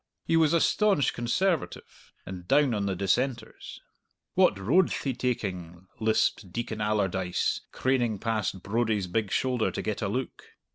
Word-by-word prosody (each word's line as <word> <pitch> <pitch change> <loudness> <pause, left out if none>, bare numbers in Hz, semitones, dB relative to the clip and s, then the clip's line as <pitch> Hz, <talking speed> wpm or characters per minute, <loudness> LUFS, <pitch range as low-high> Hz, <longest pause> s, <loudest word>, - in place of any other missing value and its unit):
He 165 - +1
was 160 -2 +4
a 170 - +4
staunch 200 -5 +2
Conservative, 160 +8 -2
and 90 -2 -8
down 145 0 +3
on 100 -2 -1
the 95 - -1
Dissenters. 115 +5 -2 0.5
"What - - +4
road'th 140 - +2
he 135 - -1
taking?" 95 -8 -4
lisped 110 -3 +1
Deacon 115 +1 -4
Allardyce, 95 -4 0
craning 120 -5 0
past 110 -3 -2
Brodie's 110 -2 0
big 100 +3 -1
shoulder 125 -3 +1
to - - -4
get 110 0 -3
a 100 - 0
look. 125 +6 -4
110 Hz, 145 wpm, -27 LUFS, 95-130 Hz, 0.5 s, was